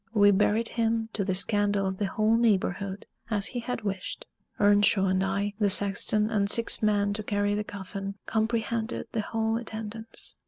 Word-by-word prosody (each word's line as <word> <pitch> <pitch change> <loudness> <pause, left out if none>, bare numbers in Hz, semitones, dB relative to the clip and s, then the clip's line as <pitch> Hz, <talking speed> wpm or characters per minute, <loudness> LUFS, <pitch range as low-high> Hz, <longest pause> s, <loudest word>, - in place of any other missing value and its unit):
We 205 -1 +6
buried 210 +3 +2
him, 225 -1 -1
to 205 - -1
the 190 -1 -1
scandal 205 0 +2
of 190 0 -3
the 205 - 0
whole 215 +3 +1
neighborhood, 200 -3 0 0.2
as 205 -3 0
he 245 - -2
had 240 -1 -5
wished. 195 -2 -5 0.3
Earnshaw 205 -1 +4
and 190 0 +1
I, 200 +1 -1
the 205 -2 +2
sexton, 205 +2 +3
and 200 -2 +1
six 230 +2 +4
men 205 -1 +1
to 215 - -2
carry 205 -1 -1
the 210 +1 -1
coffin, 195 0 -7
comprehended 225 0 -2
the 225 - -1
whole 225 +1 -1
attendance. 225 0 -5
205 Hz, 170 wpm, -27 LUFS, 200-225 Hz, 0.3 s, We